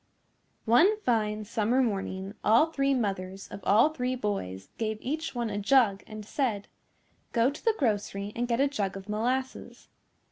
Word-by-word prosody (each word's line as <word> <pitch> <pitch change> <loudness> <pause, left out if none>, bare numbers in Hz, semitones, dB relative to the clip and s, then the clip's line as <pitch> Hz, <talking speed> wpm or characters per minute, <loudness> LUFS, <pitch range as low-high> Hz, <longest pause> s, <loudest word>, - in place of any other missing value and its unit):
One 345 - +5
fine 215 - 0
summer 230 +4 +1
morning 195 -3 -3
all 235 +10 +4
three 275 -2 +1
mothers 195 -4 -3
of - - -7
all 225 +9 +5
three 255 -4 -2
boys 95 - -4
gave 220 -1 -1
each 310 +3 -4
one 235 -2 -2
a 205 - -2
jug 205 -2 +3
and 215 -1 -8
said, 220 -5 -1 0.7
"Go 235 +2 +3
to 290 - -11
the 450 -2 +2
grocery 205 -4 -1
and 240 +1 -1
get 235 0 0
a 280 - +4
jug 200 -8 -2
of 195 +1 -10
molasses." 250 +5 -3
225 Hz, 165 wpm, -28 LUFS, 205-260 Hz, 0.7 s, One